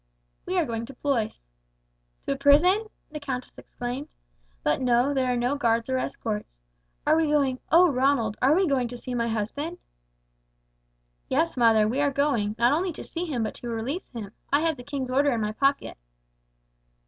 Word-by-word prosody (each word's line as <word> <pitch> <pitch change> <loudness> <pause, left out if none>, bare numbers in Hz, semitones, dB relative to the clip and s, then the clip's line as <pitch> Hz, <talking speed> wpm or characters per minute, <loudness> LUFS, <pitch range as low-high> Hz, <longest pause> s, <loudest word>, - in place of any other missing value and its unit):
"We 370 +1 -1
are 345 - +3
going 230 -2 -4
to 275 - -11
Blois." 250 - -1 0.9
"To - - -1
a - - +1
prison?" 320 +10 +4 0.2
the 300 - -5
countess 260 -3 -5
exclaimed. 245 +4 -6 0.6
"But 150 - +1
no, 250 +2 +3
there 260 -2 +1
are 245 - 0
no 245 +4 0
guards 230 -2 +1
or 260 - +1
escorts. 215 -4 -4 0.6
Are - - +4
we 320 -1 +2
going, 280 -4 +1
oh, 350 +3 +7
Ronald, 260 -6 +1
are 275 +4 +5
we 380 +1 +3
going 265 -4 +1
to 245 +1 -8
see 250 +1 -6
my 235 -1 0
husband?" 235 +10 -3 1.5
"Yes, 320 +5 +1
mother, 225 -3 +4
we 255 +6 0
are 290 - +3
going, 270 -7 0
not 240 +2 +4
only 355 +4 0
to - - -8
see 345 +1 -4
him 265 -9 -2
but 220 - -3
to 240 - -8
release 235 +10 -4
him. 215 -5 -7 0.2
I 285 +2 +4
have 325 -1 +1
the 245 - -10
king's 265 -1 -4
order 280 +2 +3
in 230 - -1
my 210 0 -1
pocket." 275 - 0
260 Hz, 185 wpm, -26 LUFS, 235-290 Hz, 1.5 s, oh